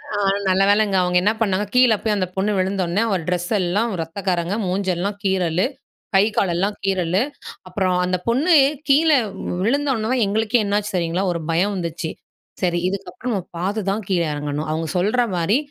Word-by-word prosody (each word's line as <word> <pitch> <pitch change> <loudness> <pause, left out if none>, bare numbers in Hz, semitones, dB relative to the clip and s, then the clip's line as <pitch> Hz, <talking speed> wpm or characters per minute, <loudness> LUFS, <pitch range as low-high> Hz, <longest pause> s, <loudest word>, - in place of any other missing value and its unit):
அ - - -1 0.3
நல்ல 190 +1 +3
வேலைங்க 205 -1 +3
அவங்க 180 0 +1
என்ன 210 - +4
பண்ணாங்க 200 -1 +1
,கீழே 250 -3 +6
போய் 215 -2 0
அந்த 185 -2 -1
பொண்ணு 195 +2 0
விழுந்தோன்னே 190 0 0
அவ 205 - +1
ட்ரெஸ் 180 -1 -2
எல்லாம் 205 +6 0
ரத்தக்கரங்க 175 +2 -2
மூஞ்செல்லாம் 190 +1 -1
கீறல்லு, 185 -2 +1 0.5
கை 195 - +6
காலெல்லாம் 195 +2 +1
கீறல்லு, 190 -1 +1 0.5
அப்புறம் 185 0 0
அந்த 185 0 0
பொண்ணு 275 +10 +3 0.4
கீழே 300 +1 +5 0.5
விழுந்தோன்னே 255 -1 +1
எங்களுக்கே 220 +3 +1
என்னாச்சு 205 0 -1
தெரியுங்களா? 175 +2 0
ஒரு 170 - -4
பயம் 190 +5 +1
வந்துச்சு. 170 -2 -4 0.5
சரி 175 -1 +1
இதுக்கப்புறம் 200 +5 -5
நம்ம 190 - -1 0.2
பார்த்து 200 +5 -1
தான் 215 +2 -2
கீழே 175 -3 +2
எறங்கணும். 150 +1 -3
அவங்க 160 +1 -2
சொல்ற 210 +7 +2
மாரி 175 +7 +2
195 Hz, 155 wpm, -21 LUFS, 175-210 Hz, 0.5 s, கீழே